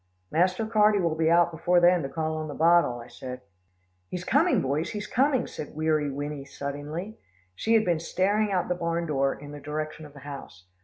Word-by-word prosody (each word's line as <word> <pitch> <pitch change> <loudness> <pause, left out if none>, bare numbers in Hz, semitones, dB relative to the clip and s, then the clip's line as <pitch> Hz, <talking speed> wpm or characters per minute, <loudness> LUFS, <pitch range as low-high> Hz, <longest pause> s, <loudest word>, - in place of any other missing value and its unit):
"Master 185 +6 +2
Carty 215 -1 +4
will 170 -3 +1
be 160 0 +1
out 170 0 +4
before 175 +2 +2
then 175 0 +5
to 135 - -4
call 160 0 -2
on 155 0 -4
the 145 - -6
bottle," 170 -6 +4
I 115 - -10
said. 125 -1 -8 0.7
"He's 180 -1 -4
coming, 310 - +3
boys, 140 +4 -1
he's 210 -1 -4
coming," 260 +2 +2
said 150 - -8
Weary 155 -1 +1
Winnie 145 +1 -4
suddenly. 145 +9 -6 0.3
She 225 - +1
had 220 - +4
been 170 -3 +1
staring 200 +5 +1
out 185 -2 0
the 180 - +1
barn 170 -1 -2
door 135 -3 +1
in 145 +1 -11
the 145 - -8
direction 155 +1 -5
of 145 - -18
the 140 - -13
house. 135 -9 -9
160 Hz, 205 wpm, -27 LUFS, 145-180 Hz, 0.7 s, then